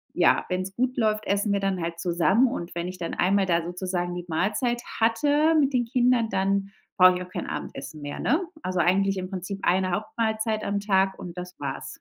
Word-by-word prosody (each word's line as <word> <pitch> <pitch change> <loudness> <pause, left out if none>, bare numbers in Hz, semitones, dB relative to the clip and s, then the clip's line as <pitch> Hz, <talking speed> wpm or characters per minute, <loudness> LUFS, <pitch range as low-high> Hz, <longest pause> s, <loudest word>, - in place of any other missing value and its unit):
ja, - - +3
wenn's 185 +1 -3
gut 255 +1 -1
läuft, 215 -2 +1
essen 200 +1 +1
wir 200 - +1
dann 190 -3 -1
halt 170 0 -4
zusammen 185 +8 +3
und 175 -8 -5
wenn 170 +1 -2
ich 185 0 -7
dann 170 - -4
einmal 195 +1 +2
da, 170 -1 +2
sozusagen, 175 0 -3
die 175 0 -6
Mahlzeit 215 +9 0 0.2
hatte 290 +8 +3
mit 275 -1 +2
den 245 -1 +2
Kindern, 245 -1 +2
dann 195 +1 0 0.3
brauche 185 -1 +7
ich 180 - -4
auch 180 - -13
kein - - -4
Abendessen 140 +3 -6
mehr, 145 0 -6
ne? 305 +9 +2 0.2
Also 185 -1 -1
eigentlich 195 +2 +2
im 185 0 -4
Prinzip 195 +1 -5
eine 185 +1 +2
Hauptmahlzeit 220 +2 -1
am 200 0 0
Tag 190 -1 +2
und 175 0 -8
das 180 0 -7
war's. 135 -1 -4
195 Hz, 205 wpm, -25 LUFS, 180-220 Hz, 0.3 s, brauche